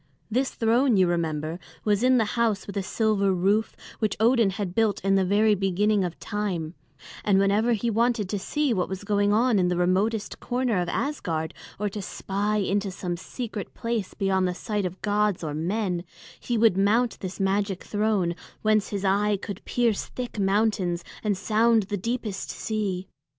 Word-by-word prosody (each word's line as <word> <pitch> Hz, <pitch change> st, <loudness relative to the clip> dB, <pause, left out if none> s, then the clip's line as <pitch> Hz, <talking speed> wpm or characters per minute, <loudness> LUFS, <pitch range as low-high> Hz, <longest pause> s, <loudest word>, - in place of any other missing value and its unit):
This 260 Hz, +4 st, +1 dB
throne, 235 Hz, +1 st, +2 dB
you 185 Hz, -, +5 dB
remember, 165 Hz, -1 st, -1 dB, 0.3 s
was 210 Hz, -1 st, +2 dB
in 255 Hz, +1 st, +5 dB
the 225 Hz, -, +3 dB
house 230 Hz, -4 st, +1 dB
with 200 Hz, -, -8 dB
a 200 Hz, -, 0 dB
silver 200 Hz, 0 st, +1 dB
roof 200 Hz, +4 st, +1 dB, 0.2 s
which 215 Hz, -3 st, 0 dB
Odin 230 Hz, -1 st, +4 dB
had 190 Hz, -1 st, -4 dB
built 220 Hz, 0 st, +2 dB
in 195 Hz, -, +3 dB
the 195 Hz, -1 st, +4 dB
very 210 Hz, +3 st, +3 dB
beginning 200 Hz, +1 st, +1 dB
of 175 Hz, -2 st, -4 dB
time; 185 Hz, -7 st, -3 dB, 0.5 s
and 200 Hz, -2 st, +3 dB
whenever 205 Hz, +4 st, +3 dB
he 230 Hz, +1 st, 0 dB
wanted 230 Hz, -2 st, +1 dB
to 205 Hz, -, -1 dB
see 295 Hz, +6 st, 0 dB
what 185 Hz, -4 st, -1 dB
was 190 Hz, +1 st, -5 dB
going 205 Hz, 0 st, +2 dB
on 225 Hz, 0 st, +3 dB
in 180 Hz, -, +3 dB
the 180 Hz, 0 st, 0 dB
remotest 200 Hz, +5 st, 0 dB
corner 245 Hz, -5 st, 0 dB
of 175 Hz, -, -2 dB
Asgard, 165 Hz, -, -2 dB, 0.2 s
or 210 Hz, -, -1 dB
to 205 Hz, +1 st, -5 dB
spy 200 Hz, +2 st, -2 dB
into 200 Hz, 0 st, 0 dB
some 180 Hz, -2 st, -4 dB
secret 215 Hz, +3 st, -6 dB
place 230 Hz, -4 st, -3 dB
beyond 190 Hz, -2 st, +1 dB
the 180 Hz, -, -2 dB
sight 205 Hz, 0 st, -2 dB
of 180 Hz, +2 st, -9 dB
gods 210 Hz, -3 st, +1 dB
or 150 Hz, -2 st, -3 dB
men, 180 Hz, +2 st, -1 dB, 0.4 s
he 240 Hz, -, -1 dB
would 220 Hz, -3 st, +5 dB
mount 225 Hz, +4 st, +2 dB
this 185 Hz, +1 st, -6 dB
magic 195 Hz, 0 st, 0 dB
throne, 205 Hz, -5 st, 0 dB, 0.3 s
whence 215 Hz, -2 st, +2 dB
his 200 Hz, -1 st, -3 dB
eye 205 Hz, +1 st, +2 dB
could 200 Hz, -1 st, -7 dB
pierce 235 Hz, -4 st, 0 dB
thick 245 Hz, -4 st, -6 dB
mountains 195 Hz, -3 st, +1 dB, 0.2 s
and 205 Hz, -3 st, +1 dB
sound 225 Hz, +2 st, +3 dB
the 205 Hz, +2 st, -3 dB
deepest 225 Hz, -1 st, -3 dB
sea. 195 Hz, -4 st, -3 dB
205 Hz, 180 wpm, -26 LUFS, 190-220 Hz, 0.5 s, you